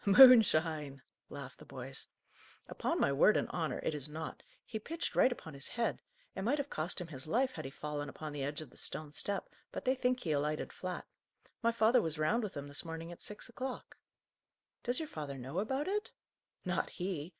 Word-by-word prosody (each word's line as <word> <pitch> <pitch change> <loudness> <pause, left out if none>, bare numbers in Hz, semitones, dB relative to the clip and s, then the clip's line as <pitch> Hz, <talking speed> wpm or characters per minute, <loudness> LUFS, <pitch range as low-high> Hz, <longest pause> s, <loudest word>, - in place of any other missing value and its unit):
"Moonshine!" 165 - +7 0.3
laughed - - -8
the - - -11
boys. - - -7 0.6
"Upon - - -1
my 140 - +3
word 155 +10 +6
and - - +1
honour, 160 -7 -1
it - - 0
is 150 -1 -4
not. 155 +1 -5 0.2
He 220 - -4
pitched 330 +9 -4
right 260 - +6
upon 160 -10 -6
his 140 0 -4
head; 235 -1 -1 0.3
it - - -3
might 245 +9 +2
have 285 -1 -3
cost 160 +5 +1
him 180 - -3
his 145 -4 -7
life 255 +9 +2
had - - -6
he - - -3
fallen 145 +1 -4
upon 155 -1 -6
the 145 - -3
edge 145 +3 -1
of 145 -5 -10
the - - -17
stone 150 +1 -2
step, 200 +5 0 0.2
but - - -5
they 260 - +4
think 255 -1 +1
he 160 - -1
alighted 150 +1 0
flat. 185 -1 -4 0.6
My 230 -1 +4
father 230 +2 +5
was 160 -4 -1
round 155 +11 +2
with 210 -8 -4
him 140 0 -5
this 145 0 -2
morning 165 0 -6
at 175 - -10
six 210 - -2
o'clock." 260 0 -5 0.9
"Does 245 0 0
your 320 - -1
father 145 - -5
know 135 +7 -3
about 265 - 0
it?" 415 +2 -1 0.5
"Not - - 0
he. 175 -4 -3
170 Hz, 205 wpm, -34 LUFS, 150-235 Hz, 0.9 s, Moonshine